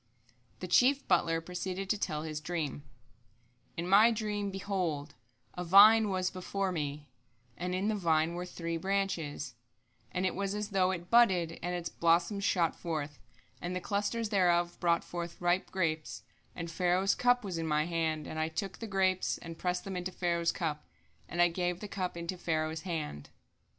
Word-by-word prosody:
The 180 Hz, -, -4 dB
chief 260 Hz, +10 st, +4 dB
butler 165 Hz, -2 st, +2 dB
proceeded 180 Hz, +2 st, -4 dB
to 210 Hz, -, +1 dB
tell 150 Hz, -5 st, -2 dB
his 155 Hz, -1 st, -4 dB
dream: 155 Hz, -3 st, -3 dB, 1.0 s
"In 170 Hz, +1 st, -2 dB
my 205 Hz, +5 st, +7 dB
dream, 210 Hz, -3 st, -2 dB
behold, 180 Hz, -7 st, -2 dB, 0.4 s
a 180 Hz, -, -4 dB
vine 210 Hz, +4 st, +7 dB
was 185 Hz, -1 st, 0 dB
before 190 Hz, +1 st, -2 dB
me; 145 Hz, -3 st, -4 dB, 0.4 s
and 180 Hz, +1 st, -3 dB
in 190 Hz, +3 st, 0 dB
the 220 Hz, -, +2 dB
vine 165 Hz, -4 st, +1 dB
were 180 Hz, +1 st, -4 dB
three 170 Hz, -1 st, -4 dB
branches; 170 Hz, -8 st, -2 dB, 0.6 s
and 180 Hz, +1 st, -1 dB
it 185 Hz, -, +1 dB
was 200 Hz, +1 st, -2 dB
as 210 Hz, 0 st, -3 dB
though 190 Hz, -2 st, +2 dB
it 175 Hz, -2 st, -4 dB
budded, 185 Hz, -9 st, +4 dB
and 180 Hz, +1 st, -2 dB
its 170 Hz, -1 st, -3 dB
blossoms 170 Hz, +4 st, +2 dB
shot 170 Hz, -4 st, +2 dB
forth, 155 Hz, -4 st, -4 dB, 0.4 s
and 175 Hz, +1 st, -3 dB
the -, -, -1 dB
clusters 210 Hz, +4 st, -1 dB
thereof 175 Hz, -4 st, +2 dB
brought 170 Hz, -1 st, +2 dB
forth 170 Hz, -1 st, -6 dB
ripe 175 Hz, +1 st, +1 dB
grapes; 160 Hz, -4 st, -2 dB, 0.3 s
and 165 Hz, -1 st, -5 dB
Pharaoh's 180 Hz, +3 st, +2 dB
cup 245 Hz, 0 st, +3 dB
was 180 Hz, -4 st, -3 dB
in 165 Hz, -, -2 dB
my 150 Hz, 0 st, +2 dB
hand; 160 Hz, -3 st, -1 dB
and 155 Hz, -, -5 dB
I 155 Hz, -, +1 dB
took 180 Hz, +3 st, -4 dB
the 225 Hz, -, -5 dB
grapes, 190 Hz, -2 st, +1 dB
and 165 Hz, -1 st, -8 dB
pressed 180 Hz, 0 st, -1 dB
them 195 Hz, -1 st, -5 dB
into 180 Hz, +1 st, -3 dB
Pharaoh's 170 Hz, -2 st, 0 dB
cup, 155 Hz, -4 st, -3 dB, 0.4 s
and 175 Hz, 0 st, +3 dB
I -, -, +6 dB
gave 175 Hz, 0 st, -2 dB
the 210 Hz, -, -6 dB
cup 185 Hz, -3 st, -3 dB
into 170 Hz, +2 st, -4 dB
Pharaoh's 160 Hz, -1 st, -1 dB
hand." 155 Hz, -, -4 dB
175 Hz, 175 wpm, -31 LUFS, 165-195 Hz, 1.0 s, my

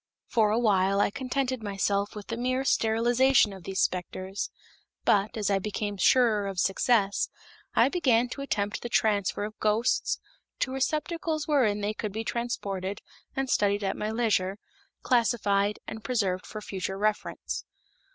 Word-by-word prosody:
For 220 Hz, -3 st, +2 dB
a 215 Hz, -, +2 dB
while 200 Hz, -4 st, +3 dB
I 205 Hz, -, +3 dB
contented 260 Hz, 0 st, -2 dB
myself 200 Hz, 0 st, -1 dB
with 210 Hz, -1 st, -8 dB
the 230 Hz, -, -2 dB
mere 255 Hz, +2 st, 0 dB
sterilization 235 Hz, 0 st, +3 dB
of 190 Hz, -3 st, -11 dB
these 190 Hz, 0 st, -1 dB
specters, 185 Hz, +2 st, -2 dB, 0.6 s
but, 205 Hz, +2 st, +2 dB
as 205 Hz, -2 st, 0 dB
I 195 Hz, -, +3 dB
became 205 Hz, +1 st, -3 dB
surer 215 Hz, 0 st, +4 dB
of 195 Hz, -1 st, -5 dB
success, 200 Hz, +1 st, +2 dB, 0.5 s
I -, -, +6 dB
began 255 Hz, -7 st, +2 dB
to 275 Hz, -, -6 dB
attempt 205 Hz, -6 st, -2 dB
the 240 Hz, -, -5 dB
transfer 205 Hz, -3 st, +1 dB
of 215 Hz, +1 st, -6 dB
ghosts 215 Hz, +3 st, +1 dB, 0.4 s
to 260 Hz, -, +1 dB
receptacles 310 Hz, +3 st, -1 dB
wherein 235 Hz, -9 st, +2 dB
they 205 Hz, +1 st, -1 dB
could 215 Hz, -2 st, -4 dB
be 220 Hz, +1 st, -3 dB
transported 205 Hz, -5 st, -3 dB, 0.3 s
and 270 Hz, 0 st, -1 dB
studied 205 Hz, -3 st, +2 dB
at 195 Hz, -, 0 dB
my 210 Hz, -, -3 dB
leisure, 215 Hz, -4 st, +1 dB, 0.5 s
classified 210 Hz, -4 st, +2 dB
and 220 Hz, 0 st, -7 dB
preserved 200 Hz, -8 st, -1 dB
for 215 Hz, -, -7 dB
future 190 Hz, -1 st, -4 dB
reference. 210 Hz, +1 st, -2 dB
215 Hz, 150 wpm, -28 LUFS, 200-245 Hz, 0.6 s, I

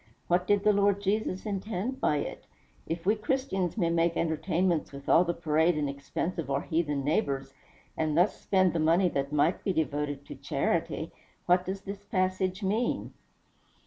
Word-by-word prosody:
What 180 Hz, +1 st, +2 dB
did 205 Hz, -1 st, +3 dB
the 210 Hz, 0 st, +5 dB
Lord 200 Hz, 0 st, +3 dB
Jesus 200 Hz, -1 st, -1 dB
intend 210 Hz, +4 st, -3 dB
by 150 Hz, -, +2 dB
it? -, -, -5 dB, 0.4 s
If 165 Hz, +1 st, -4 dB
we 205 Hz, -, +5 dB
Christians 215 Hz, -5 st, -1 dB
may 170 Hz, -5 st, +1 dB
make 170 Hz, 0 st, +2 dB
entertainments 170 Hz, +1 st, 0 dB
with 140 Hz, 0 st, -10 dB
all 170 Hz, -, +6 dB
the 170 Hz, -, 0 dB
parade 160 Hz, 0 st, +2 dB
and 150 Hz, -1 st, 0 dB
expense 140 Hz, +5 st, -3 dB
of 150 Hz, -5 st, -4 dB
our 140 Hz, 0 st, 0 dB
heathen 150 Hz, -4 st, -1 dB
neighbors, 135 Hz, -4 st, -1 dB, 0.4 s
and 155 Hz, -1 st, 0 dB
thus 180 Hz, +4 st, +2 dB
spend 185 Hz, -3 st, +3 dB
the 165 Hz, -, 0 dB
money 170 Hz, +4 st, +4 dB
that 140 Hz, -2 st, -2 dB
might 150 Hz, +4 st, +2 dB
be 195 Hz, -, 0 dB
devoted 145 Hz, -2 st, -2 dB
to -, -, -8 dB
charity, -, -, -1 dB, 0.3 s
what 180 Hz, +1 st, +3 dB
does 195 Hz, +1 st, -3 dB
this 200 Hz, 0 st, -7 dB
passage 185 Hz, 0 st, -1 dB
mean?" 215 Hz, +5 st, -1 dB
175 Hz, 175 wpm, -29 LUFS, 155-195 Hz, 0.4 s, all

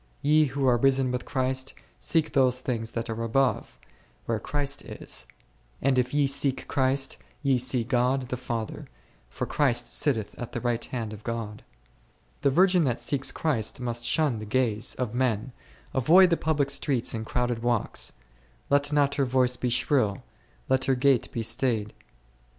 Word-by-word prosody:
Ye 155 Hz, +2 st, +5 dB
who 135 Hz, -1 st, -1 dB
are 125 Hz, -1 st, +4 dB
risen 135 Hz, 0 st, +2 dB
with 125 Hz, 0 st, -3 dB
Christ, 130 Hz, -1 st, -2 dB, 0.2 s
seek 160 Hz, -2 st, +1 dB
those 130 Hz, -2 st, +3 dB
things 115 Hz, -3 st, -3 dB
that 115 Hz, 0 st, -2 dB
are 115 Hz, 0 st, -4 dB
above, 120 Hz, +1 st, 0 dB, 0.5 s
where 115 Hz, -2 st, -1 dB
Christ 145 Hz, +1 st, -2 dB
is; -, -, -6 dB, 0.5 s
and 135 Hz, -1 st, +2 dB
if 125 Hz, 0 st, 0 dB
ye 145 Hz, -1 st, +2 dB
seek 135 Hz, -1 st, +1 dB
Christ, 135 Hz, 0 st, +1 dB, 0.3 s
ye 135 Hz, -3 st, +3 dB
see 125 Hz, -1 st, +2 dB
God 125 Hz, +2 st, 0 dB
the 125 Hz, -, -1 dB
Father, 115 Hz, -3 st, -5 dB, 0.4 s
for -, -, -4 dB
Christ 135 Hz, -5 st, +1 dB
sitteth 115 Hz, -9 st, 0 dB
on 120 Hz, -, -4 dB
the -, -, -3 dB
right 120 Hz, -1 st, -1 dB
hand 115 Hz, -4 st, -4 dB
of 105 Hz, 0 st, -11 dB
God. 115 Hz, -3 st, -5 dB, 0.8 s
The 140 Hz, -, +3 dB
virgin 180 Hz, +4 st, +4 dB
that 125 Hz, -2 st, 0 dB
seeks 135 Hz, -2 st, -1 dB
Christ 130 Hz, -10 st, -1 dB
must 120 Hz, -1 st, -2 dB
shun 125 Hz, 0 st, +1 dB
the 110 Hz, -, -6 dB
gaze 110 Hz, -2 st, 0 dB
of 125 Hz, -3 st, -3 dB
men, 125 Hz, -1 st, 0 dB, 0.4 s
avoid 175 Hz, +8 st, +6 dB
the -, -, +5 dB
public 150 Hz, -4 st, 0 dB
streets 135 Hz, -4 st, 0 dB
and 110 Hz, -1 st, -3 dB
crowded 120 Hz, 0 st, -1 dB
walks; 120 Hz, -2 st, -1 dB, 0.6 s
let 145 Hz, +1 st, +3 dB
not 145 Hz, -1 st, +3 dB
her -, -, +3 dB
voice 125 Hz, 0 st, +2 dB
be 125 Hz, -, -2 dB
shrill; 120 Hz, -4 st, +1 dB, 0.4 s
let 130 Hz, 0 st, +2 dB
her 135 Hz, -, +2 dB
gait 130 Hz, -1 st, +2 dB
be 115 Hz, -, -3 dB
staid, 115 Hz, -2 st, 0 dB
herself -, -, -21 dB
n -, -, -33 dB
Jer. -, -, -26 dB
130 Hz, 175 wpm, -27 LUFS, 115-140 Hz, 0.8 s, avoid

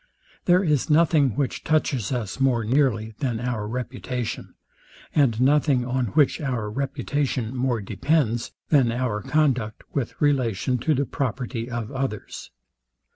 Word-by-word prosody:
There 180 Hz, +1 st, +4 dB
is 150 Hz, -4 st, +1 dB
nothing, 150 Hz, -6 st, +4 dB
which 140 Hz, -3 st, -2 dB
touches 140 Hz, -8 st, 0 dB
us 120 Hz, -3 st, -3 dB
more 130 Hz, -4 st, +2 dB
nearly 115 Hz, -3 st, +1 dB
than 125 Hz, -5 st, -1 dB
our 120 Hz, -4 st, -2 dB
reputation, 125 Hz, 0 st, -4 dB, 0.6 s
and 125 Hz, -7 st, +3 dB
nothing 135 Hz, -1 st, +3 dB
on 125 Hz, -1 st, 0 dB
which 145 Hz, +6 st, +2 dB
our 120 Hz, -7 st, -2 dB
reputation 135 Hz, -1 st, -2 dB
more 125 Hz, -3 st, 0 dB
depends 115 Hz, -, 0 dB, 0.2 s
than 135 Hz, -6 st, +4 dB
our 115 Hz, -3 st, -1 dB
conduct, 130 Hz, -6 st, 0 dB
with 135 Hz, -5 st, -3 dB
relation 130 Hz, -4 st, +1 dB
to 155 Hz, +6 st, +1 dB
the 140 Hz, +2 st, +1 dB
property 125 Hz, -2 st, -3 dB
of 115 Hz, -2 st, -4 dB
others. 135 Hz, -6 st, -4 dB
125 Hz, 130 wpm, -24 LUFS, 115-140 Hz, 0.6 s, There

